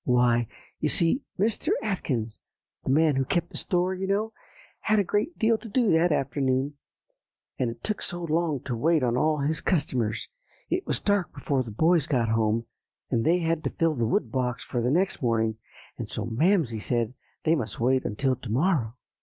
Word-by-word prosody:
"Why, 120 -2 +3 0.3
you - - +1
see, 170 - +2 0.2
Mr. 215 +3 0
Atkins, 130 - -2 0.4
the - - -4
man 150 +1 +4
who 135 - +2
kept 170 +6 -1
the - - -7
store, 180 +1 0
you 190 +1 -3
know, 210 +3 0 0.5
had 215 0 +2
a 205 - +4
great 210 - -1
deal 225 0 +3
to 230 - -10
do 230 0 +2
that 165 +2 +4
afternoon; 135 -1 0 0.9
and 125 - +1
it 115 0 -9
took 215 -2 -2
so 175 0 -4
long 160 -4 0
to 125 - -3
wait 155 +5 +2
on 120 -1 +1
all 155 +4 +2
his 150 +2 0
customers 125 - 0 0.4
that 350 - +3
it 370 - -9
was - - 0
dark 205 -3 +1
before 140 -3 0
the 120 - -6
boys 160 +7 +2
got 120 -6 +1
home, 110 +1 +1 0.5
and 115 - +2
they 170 +7 +4
had 165 -1 0
to - - 0
fill 165 -1 +1
the 120 -5 0
wood 115 0 0
box 125 0 -1
for 120 - -2
the 120 - +1
next 180 +7 +1
morning, 110 -3 +1 0.4
and - - -4
so 110 - -3
Mamsie 130 - +2
said 120 0 0 0.3
they 160 - +3
must 115 -10 -2
wait 130 +2 +2
until 130 +5 0
to 125 -2 -9
morrow." 130 - +1
140 Hz, 195 wpm, -27 LUFS, 120-175 Hz, 0.9 s, man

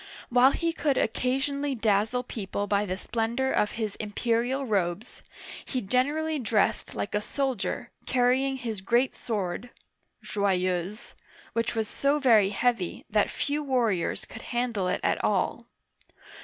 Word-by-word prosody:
While 250 +2 +6
he 335 +3 -1
could 290 -4 +1
occasionally 270 +4 0
dazzle 220 +2 +1
people 205 -4 -4
by 205 0 +1
the 185 0 -2
splendor 235 +5 -1
of 210 - +1
his 220 -3 -2
imperial 235 +5 0
robes, 200 -1 -1 0.4
he 255 - -2
generally 290 +8 0
dressed 215 -4 +1
like 205 - -3
a 210 - +1
soldier, 260 0 -2 0.2
carrying 260 +2 +2
his 225 -6 -4
great 240 +6 +2
sword 205 0 -3 0.5
("Joyeuse"), 185 0 -1 0.4
which 230 +1 0
was 220 -1 0
so 280 +6 +1
very 225 -8 +5
heavy 210 -3 0
that 210 -1 +3
few 290 +1 -1
warriors 235 -10 0
could - - -10
handle 240 -6 -1
it - - -1
at - - +1
all. - - 0
235 Hz, 135 wpm, -27 LUFS, 205-260 Hz, 0.5 s, While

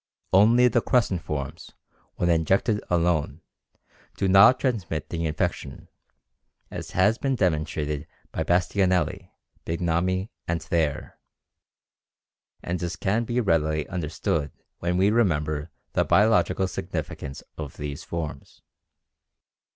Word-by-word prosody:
Only 115 +6 +6
the 120 0 +2
crescent 105 -9 +1
forms, 70 -3 -6 0.4
when 85 - 0
injected 95 +6 +2
alone, 85 -3 +1 0.8
do 95 - +1
not 100 +7 +7
transmit 100 - -2
the 85 -1 -2
infection, 75 - -3 0.8
as - - -7
has 105 +5 +3
been 135 -1 0
demonstrated 75 - -1 0.2
by 80 - -2
Bastianelli, 90 +2 +1 0.3
Bignami 90 +5 -1 0.2
and 85 0 0
Thayer, 80 -6 -2 1.4
and 90 +1 -3
as 85 +1 -3
can 105 +6 0
be 120 +2 -1
readily 80 -7 +1
understood 80 -3 -2 0.3
when 90 +1 -1
we 95 +3 +4
remember 75 -8 +1 0.2
the - - +3
biological 105 -3 +3
significance 70 -6 -5 0.2
of 75 -3 -6
these 70 -1 -5
forms. 80 -4 -6
85 Hz, 110 wpm, -25 LUFS, 80-100 Hz, 1.4 s, not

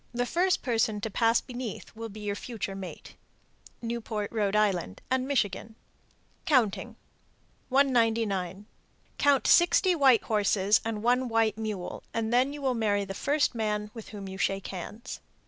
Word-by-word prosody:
The 245 0 +1
first 360 +7 +1
person 225 -4 +1
to 220 - -3
pass 230 +3 +3
beneath 245 -4 -7
will 225 0 -6
be 215 +1 -10
your 205 -1 -2
future 205 -2 -5
mate. 190 -2 -8 0.7
Newport, 225 -3 -3
R.I., 205 - +1 0.2
and 260 0 +1
Michigan. 220 -5 -1 0.7
COUNTING. 245 -10 +2 0.7
199. 225 -8 +1 0.5
Count 285 -2 +3
sixty 355 +1 +5
white 270 -8 +5
horses 205 -1 +2
and 220 -2 -3
one 250 +2 +2
white 225 -1 +1
mule, 210 -5 -4
then 240 +4 +2
you 290 -1 -8
will 260 -1 +2
marry 205 -3 +1
the 195 - -6
first 285 +8 +1
man 210 -2 -2
with 225 -2 -9
whom 200 -2 -8
you 190 0 -8
shake 195 -1 0
hands. 210 +6 -7
225 Hz, 145 wpm, -28 LUFS, 205-250 Hz, 0.7 s, sixty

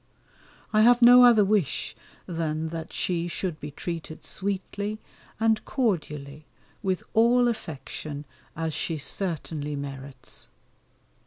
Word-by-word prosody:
I 215 - +5
have 240 +2 +6
no 245 +1 +10
other 230 -4 +7
wish 200 -7 0 0.3
than 160 -2 -2
that 165 0 -6
she 175 -1 -1
should 175 -2 -3
be 150 - -6
treated 160 +1 -6
sweetly 200 +2 -3 0.4
and 220 -1 +2
cordially 150 - -2 0.3
with 190 -4 -1
all 240 +2 +5
affection 150 - -5 0.3
as 160 -1 -2
she 165 +1 -2
certainly 155 -2 -3
merits. 135 -2 -8
170 Hz, 110 wpm, -26 LUFS, 150-215 Hz, 0.4 s, no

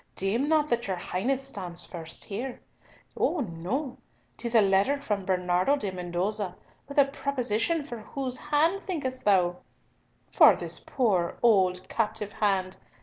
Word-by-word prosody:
Deem 230 +10 0
not 310 -2 +3
that 235 -2 +1
your 190 - -1
Highness 255 +10 -2
stands 180 -8 -5
first 165 -2 -7
here! 240 +5 -5 0.6
Oh 340 - +1
no! 235 - -3 0.4
'Tis 235 -1 -3
a 225 - +8
letter 200 +9 +3
from 205 -8 -2
Bernardo 180 +6 +2
de 210 -9 -3
Mendoza 185 +2 -2 0.3
with 280 - -9
a 280 - +7
proposition 275 +2 0
for 240 -5 -7
whose 255 +3 -4
hand 310 +6 +1
thinkest 265 -8 -3
thou? 180 -3 +3 0.7
For - - +7
this - - -5
poor 195 -10 0
old 185 -5 +3
captive 220 -2 -2
hand! 190 -3 0
215 Hz, 145 wpm, -28 LUFS, 185-270 Hz, 0.7 s, a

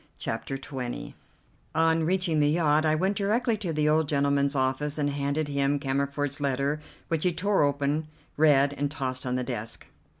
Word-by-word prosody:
CHAPTER 135 - -3
XX 130 -2 -6 0.6
On 165 0 +3
reaching 180 -2 +1
the 145 0 +4
yacht 155 -1 +3
I 155 - +3
went 190 +5 +1
directly 220 +4 +1
to 190 -5 -3
the 150 -1 +1
old 155 -1 +2
gentleman's 140 0 +1
office 135 +3 0
and 145 -1 0
handed 140 +2 -1
him 140 0 +1
Cammerford's 140 +1 -2
letter, 140 +2 0 0.3
which 165 -2 -1
he 180 - +3
tore 195 +4 +1
open, 145 +2 +1 0.3
read, 145 -2 +4
and 145 0 -1
tossed 130 -2 -2
on 125 - 0
the 125 - -1
desk. 115 -3 -5
145 Hz, 170 wpm, -27 LUFS, 140-160 Hz, 0.6 s, the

